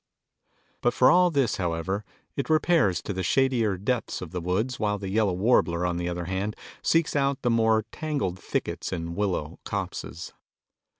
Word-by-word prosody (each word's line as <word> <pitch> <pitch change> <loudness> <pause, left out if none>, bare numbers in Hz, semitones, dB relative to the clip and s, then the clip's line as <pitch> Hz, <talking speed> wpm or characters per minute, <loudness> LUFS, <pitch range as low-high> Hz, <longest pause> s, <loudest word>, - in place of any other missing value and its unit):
But 120 0 +2
for 130 - +6
all 180 0 +5
this, 140 -9 +1
however, 90 +3 -2 0.3
it 140 - -3
repairs 155 - +3
to 100 - -3
the 95 - -3
shadier 120 -4 +2
depths 115 +5 -1
of 90 - -7
the 90 -1 -3
woods 100 +9 -1
while 105 -1 0
the 100 -1 -5
yellow 105 -2 +2
warbler 90 -4 +2
on 90 -1 0
the 85 0 -2
other 90 0 -3
hand 95 +4 -2 0.3
seeks 165 -2 +2
out 140 -1 +1
the 120 - +2
more 110 -1 +3
tangled 140 - -2
thickets - - -3
and 85 -2 -4
willow 95 -7 -2
copses. 85 - -5
105 Hz, 170 wpm, -26 LUFS, 90-130 Hz, 0.3 s, for